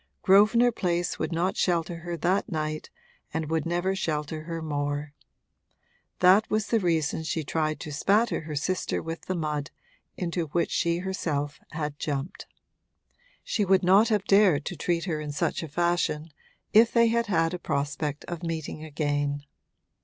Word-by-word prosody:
Grosvenor 215 Hz, +5 st, +5 dB
Place 175 Hz, -5 st, -1 dB
would -, -, -2 dB
not 175 Hz, +3 st, 0 dB
shelter 170 Hz, -1 st, 0 dB
her 170 Hz, 0 st, -5 dB
that 185 Hz, +6 st, 0 dB
night 155 Hz, -1 st, -3 dB, 0.4 s
and 160 Hz, 0 st, -3 dB
would 160 Hz, 0 st, 0 dB
never 175 Hz, +3 st, 0 dB
shelter 155 Hz, -3 st, -3 dB
her 165 Hz, 0 st, -4 dB
more: 145 Hz, -1 st, -3 dB, 1.1 s
that 185 Hz, +4 st, +6 dB
was 215 Hz, 0 st, 0 dB
the 230 Hz, -, +3 dB
reason 160 Hz, -5 st, 0 dB
she 160 Hz, 0 st, -2 dB
tried 155 Hz, +1 st, -1 dB
to 155 Hz, -, -6 dB
spatter 205 Hz, +10 st, +2 dB
her 155 Hz, -1 st, -6 dB
sister 180 Hz, +6 st, -1 dB
with 165 Hz, 0 st, -5 dB
the 185 Hz, -, -1 dB
mud 150 Hz, -3 st, -2 dB, 0.5 s
into 170 Hz, -2 st, -2 dB
which 170 Hz, +4 st, 0 dB
she 170 Hz, 0 st, +1 dB
herself 155 Hz, -6 st, -2 dB
had 150 Hz, -2 st, -4 dB
jumped. 145 Hz, +2 st, -4 dB, 1.0 s
She 210 Hz, -, 0 dB
would 190 Hz, -1 st, +3 dB
not 195 Hz, +5 st, +5 dB
have 210 Hz, -3 st, +1 dB
dared 195 Hz, -8 st, +4 dB
to 180 Hz, -, -4 dB
treat 170 Hz, +2 st, -1 dB
her 160 Hz, -5 st, -2 dB
in 150 Hz, -1 st, -4 dB
such 145 Hz, -, -1 dB
a 165 Hz, -, -5 dB
fashion 170 Hz, -1 st, 0 dB, 0.4 s
if 225 Hz, +2 st, +6 dB
they 235 Hz, -1 st, +4 dB
had 235 Hz, 0 st, +1 dB
had 165 Hz, -3 st, +1 dB
a 180 Hz, -, -3 dB
prospect 145 Hz, 0 st, -2 dB
of 175 Hz, -1 st, -6 dB
meeting 160 Hz, -2 st, -4 dB
again. 145 Hz, -2 st, -1 dB
165 Hz, 160 wpm, -27 LUFS, 150-185 Hz, 1.1 s, that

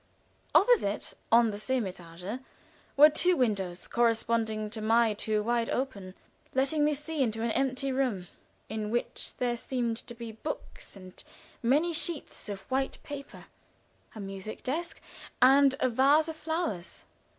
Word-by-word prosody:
Opposite, 415 Hz, -, +3 dB, 0.2 s
on 230 Hz, -1 st, +5 dB
the 205 Hz, -, -6 dB
same 255 Hz, +3 st, 0 dB
étage, 180 Hz, +3 st, -7 dB, 0.6 s
were 300 Hz, +2 st, +9 dB
two 360 Hz, +4 st, +3 dB
windows, 195 Hz, -8 st, -1 dB
corresponding 225 Hz, -2 st, 0 dB
to 220 Hz, -, -5 dB
my 225 Hz, 0 st, +3 dB
two, 210 Hz, 0 st, -1 dB
wide 235 Hz, +1 st, 0 dB
open, 200 Hz, -8 st, -3 dB, 0.4 s
letting 275 Hz, +3 st, +2 dB
me 300 Hz, 0 st, +2 dB
see 300 Hz, +1 st, -3 dB
into 225 Hz, -3 st, 0 dB
an 230 Hz, -, 0 dB
empty 270 Hz, +2 st, 0 dB
room, 255 Hz, -9 st, -1 dB, 0.4 s
in 215 Hz, 0 st, -4 dB
which 240 Hz, +2 st, -3 dB
there 245 Hz, -1 st, 0 dB
seemed 240 Hz, -2 st, -2 dB
to 240 Hz, -, -8 dB
be 230 Hz, -1 st, -7 dB
books 225 Hz, +2 st, -7 dB
and 185 Hz, -1 st, -12 dB, 0.4 s
many 295 Hz, +8 st, +2 dB
sheets 325 Hz, -7 st, -1 dB
of 200 Hz, -1 st, -5 dB
white 265 Hz, +1 st, 0 dB
paper, 285 Hz, -1 st, -8 dB, 0.7 s
a -, -, -8 dB
music 195 Hz, +1 st, -7 dB
desk 330 Hz, +6 st, -3 dB, 0.4 s
and 270 Hz, +1 st, +6 dB
a -, -, +3 dB
vase 275 Hz, +6 st, +4 dB
of 320 Hz, -, -5 dB
flowers. 315 Hz, -, -4 dB
235 Hz, 145 wpm, -29 LUFS, 215-275 Hz, 0.7 s, were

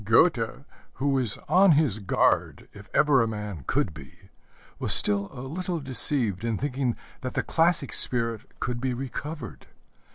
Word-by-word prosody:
Goethe, 115 Hz, -, +1 dB, 0.3 s
who 140 Hz, +1 st, -2 dB
was 130 Hz, -6 st, -1 dB
on 190 Hz, -1 st, +4 dB
his 140 Hz, -8 st, +4 dB
guard 100 Hz, -, -1 dB
if 100 Hz, +1 st, -14 dB
ever 145 Hz, -4 st, +3 dB
a 115 Hz, -, 0 dB
man 105 Hz, -8 st, -7 dB
could 85 Hz, -, -1 dB
be, 70 Hz, -4 st, -16 dB, 0.5 s
was 105 Hz, -, +3 dB
still 100 Hz, +2 st, +2 dB
a 125 Hz, -, -10 dB
little 170 Hz, +6 st, -5 dB
deceived 130 Hz, -7 st, +3 dB
in 115 Hz, -2 st, -2 dB
thinking 130 Hz, -2 st, -2 dB, 0.3 s
that 130 Hz, -1 st, -6 dB
the -, -, -1 dB
classic 165 Hz, -4 st, +1 dB
spirit 115 Hz, -3 st, +3 dB
could 120 Hz, 0 st, -4 dB
be 130 Hz, -1 st, -2 dB
recovered. 135 Hz, +1 st, -8 dB
125 Hz, 155 wpm, -25 LUFS, 105-145 Hz, 0.5 s, on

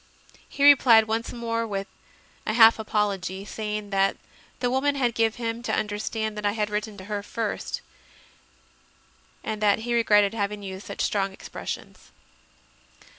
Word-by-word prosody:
He 280 Hz, -, -3 dB
replied 255 Hz, -6 st, +7 dB
once 225 Hz, +1 st, -2 dB
more 230 Hz, -1 st, -2 dB
with 195 Hz, -2 st, -3 dB, 0.6 s
a 215 Hz, -, +1 dB
half 225 Hz, 0 st, +7 dB
apology, 200 Hz, -3 st, -1 dB
saying 210 Hz, -1 st, -4 dB
that 195 Hz, 0 st, +2 dB, 0.4 s
the 245 Hz, -1 st, 0 dB
woman 280 Hz, +2 st, +1 dB
had 245 Hz, -4 st, +1 dB
given 225 Hz, +1 st, 0 dB
him -, -, -10 dB
to 240 Hz, -, -1 dB
under 210 Hz, -1 st, -2 dB
stand 220 Hz, 0 st, -3 dB
that 210 Hz, -, -6 dB
I 205 Hz, 0 st, +1 dB
had 210 Hz, -1 st, -2 dB
written 210 Hz, 0 st, -3 dB
to 190 Hz, -, -9 dB
her 205 Hz, 0 st, -3 dB
first, 220 Hz, +1 st, -4 dB, 1.6 s
and 215 Hz, -1 st, -4 dB
that 210 Hz, 0 st, +3 dB
he 240 Hz, -, -1 dB
regretted 210 Hz, -3 st, +4 dB
having 205 Hz, -1 st, -3 dB
used 190 Hz, 0 st, -7 dB
such -, -, -5 dB
strong 195 Hz, -1 st, 0 dB
expressions. -, -, -8 dB
215 Hz, 155 wpm, -25 LUFS, 205-230 Hz, 1.6 s, replied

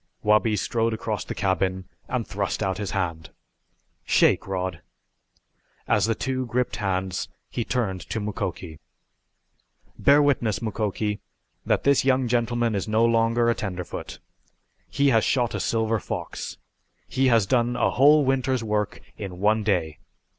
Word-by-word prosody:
Wabi 105 Hz, +1 st, +3 dB
strode 115 Hz, +3 st, 0 dB
across 110 Hz, -1 st, -3 dB
the -, -, -6 dB
cabin 95 Hz, -1 st, -1 dB, 0.2 s
and -, -, -2 dB
thrust -, -, -2 dB
out 95 Hz, 0 st, -1 dB
his 100 Hz, -, -3 dB
hand. 85 Hz, -5 st, -3 dB, 0.7 s
"Shake, -, -, +3 dB
Rod!" 90 Hz, -3 st, -3 dB, 1.1 s
As -, -, +3 dB
the 115 Hz, -, +1 dB
two 130 Hz, +1 st, -2 dB
gripped 125 Hz, +2 st, -1 dB
hands 95 Hz, -2 st, -2 dB, 0.2 s
he 120 Hz, -, -2 dB
turned 105 Hz, -7 st, -2 dB
to 110 Hz, -, -2 dB
Mukoki. 90 Hz, -6 st, -4 dB, 1.2 s
"Bear 140 Hz, +1 st, +6 dB
witness, 120 Hz, -7 st, +1 dB
Mukoki, 105 Hz, -1 st, -2 dB, 0.5 s
that -, -, +2 dB
this 140 Hz, -1 st, +4 dB
young 130 Hz, -1 st, +2 dB
gentleman 120 Hz, -1 st, +1 dB
is 100 Hz, -1 st, -2 dB
no 110 Hz, +2 st, +3 dB
longer 115 Hz, 0 st, +2 dB
a 120 Hz, -, +4 dB
tenderfoot. 90 Hz, -5 st, -5 dB, 0.7 s
He 140 Hz, 0 st, +2 dB
has 115 Hz, -4 st, +4 dB
shot 120 Hz, -3 st, +1 dB
a -, -, -2 dB
silver 110 Hz, -1 st, 0 dB
fox. -, -, -5 dB, 0.5 s
He 130 Hz, 0 st, +1 dB
has 115 Hz, -4 st, +4 dB
done 120 Hz, +3 st, +1 dB
a -, -, +2 dB
whole 145 Hz, +2 st, +5 dB
winter's 130 Hz, -2 st, +1 dB
work 105 Hz, -1 st, -2 dB, 0.2 s
in 95 Hz, -3 st, -7 dB
one 105 Hz, +2 st, +3 dB
day. 85 Hz, -7 st, 0 dB
110 Hz, 145 wpm, -25 LUFS, 95-120 Hz, 1.2 s, Bear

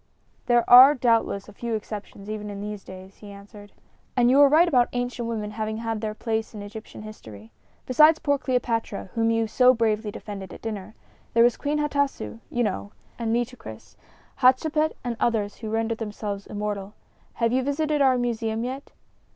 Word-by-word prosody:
"There 240 Hz, -1 st, +3 dB
are 260 Hz, +4 st, +9 dB
doubtless 230 Hz, -5 st, +1 dB
a 210 Hz, -, -13 dB
few 235 Hz, +2 st, -3 dB
exceptions, 205 Hz, -1 st, -7 dB
even 210 Hz, -1 st, -5 dB
in 200 Hz, -1 st, -7 dB
these 210 Hz, -1 st, -6 dB
days," 185 Hz, +1 st, -12 dB
he 205 Hz, -, -12 dB
answered. 205 Hz, +1 st, -13 dB, 0.5 s
"And 245 Hz, 0 st, +4 dB
you 275 Hz, +2 st, +6 dB
are 285 Hz, -, +7 dB
right 320 Hz, +5 st, +5 dB
about 250 Hz, -7 st, +3 dB
ancient 245 Hz, -1 st, -3 dB
women 215 Hz, -2 st, -4 dB
having 220 Hz, 0 st, -3 dB
had 225 Hz, -1 st, -3 dB
their 215 Hz, -1 st, -3 dB
place 220 Hz, 0 st, -3 dB
in 205 Hz, -, -7 dB
Egyptian 210 Hz, +1 st, -10 dB
history. 110 Hz, -, -12 dB, 0.3 s
Besides 305 Hz, +5 st, +5 dB
poor 285 Hz, -2 st, 0 dB
Cleopatra, 230 Hz, -7 st, -2 dB
whom 225 Hz, 0 st, +1 dB
you 225 Hz, 0 st, +1 dB
so 250 Hz, +3 st, +4 dB
bravely 220 Hz, -2 st, 0 dB
defended 200 Hz, -3 st, -8 dB
at -, -, -15 dB
dinner, 215 Hz, -2 st, -6 dB, 0.4 s
there 230 Hz, -, +6 dB
was 240 Hz, -1 st, +4 dB
Queen 295 Hz, +1 st, -2 dB
Hatasu, 285 Hz, -, -2 dB
you 245 Hz, -, 0 dB
know; 205 Hz, -1 st, -3 dB, 0.3 s
and 230 Hz, -1 st, -1 dB
Nitocris, 240 Hz, +2 st, -4 dB, 0.4 s
Hatshepset 305 Hz, +5 st, +3 dB
and 240 Hz, -2 st, -3 dB
others 210 Hz, -3 st, 0 dB
who 220 Hz, -, -6 dB
rendered 225 Hz, +1 st, -1 dB
themselves 205 Hz, -2 st, -5 dB
immortal. 205 Hz, -1 st, -4 dB, 0.4 s
Have 230 Hz, 0 st, 0 dB
you 260 Hz, -, +2 dB
visited 295 Hz, +2 st, 0 dB
our 260 Hz, -2 st, +4 dB
museum 230 Hz, -2 st, -2 dB
yet?" 260 Hz, +3 st, -5 dB
225 Hz, 175 wpm, -25 LUFS, 210-250 Hz, 0.5 s, are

